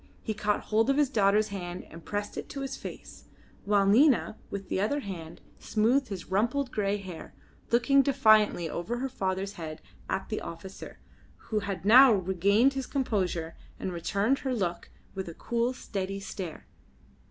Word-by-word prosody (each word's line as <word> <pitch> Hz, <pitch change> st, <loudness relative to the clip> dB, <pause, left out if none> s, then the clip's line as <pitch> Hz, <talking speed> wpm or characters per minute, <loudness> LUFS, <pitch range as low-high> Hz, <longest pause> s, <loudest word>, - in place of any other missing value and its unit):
He 220 Hz, -, -2 dB
caught 210 Hz, 0 st, 0 dB
hold 225 Hz, +3 st, +1 dB
of 275 Hz, -, +3 dB
his 290 Hz, -2 st, +3 dB
daughter's 210 Hz, -1 st, +3 dB
hand 180 Hz, -3 st, -6 dB
and 165 Hz, +1 st, -11 dB
pressed 205 Hz, 0 st, -4 dB
it -, -, -6 dB
to 275 Hz, -, -5 dB
his 270 Hz, 0 st, -4 dB
face, -, -, -10 dB, 0.4 s
while 200 Hz, -1 st, +3 dB
Nina 240 Hz, +3 st, +4 dB
with 195 Hz, -1 st, -5 dB
the 190 Hz, -, -1 dB
other 285 Hz, +8 st, 0 dB
hand 170 Hz, -7 st, -8 dB, 0.2 s
smoothed 245 Hz, +5 st, +2 dB
his 195 Hz, -5 st, -6 dB
rumpled 240 Hz, +7 st, 0 dB
grey 205 Hz, -1 st, 0 dB
hair, 185 Hz, -4 st, -9 dB, 0.3 s
looking 260 Hz, +4 st, +4 dB
defiantly 215 Hz, -10 st, +4 dB
over 175 Hz, +9 st, -3 dB
her 265 Hz, +2 st, -2 dB
father's 195 Hz, -3 st, -2 dB
head 155 Hz, -1 st, -6 dB, 0.3 s
at 190 Hz, -, -2 dB
the 215 Hz, -, -2 dB
officer, 170 Hz, +3 st, -9 dB, 0.4 s
who 215 Hz, -, -2 dB
had 200 Hz, -3 st, -5 dB
now 255 Hz, +5 st, +9 dB
regained 200 Hz, +7 st, +3 dB
his 270 Hz, -1 st, -4 dB
composure 185 Hz, -, -1 dB, 0.2 s
and 185 Hz, -, -3 dB
returned 200 Hz, +9 st, 0 dB
her 260 Hz, -2 st, -2 dB
look 175 Hz, -6 st, -2 dB, 0.2 s
with 190 Hz, -2 st, -5 dB
a 165 Hz, -, -9 dB
cool, 235 Hz, +1 st, -1 dB
steady 195 Hz, -5 st, -4 dB
stare. 190 Hz, -4 st, -7 dB
205 Hz, 165 wpm, -29 LUFS, 190-245 Hz, 0.4 s, now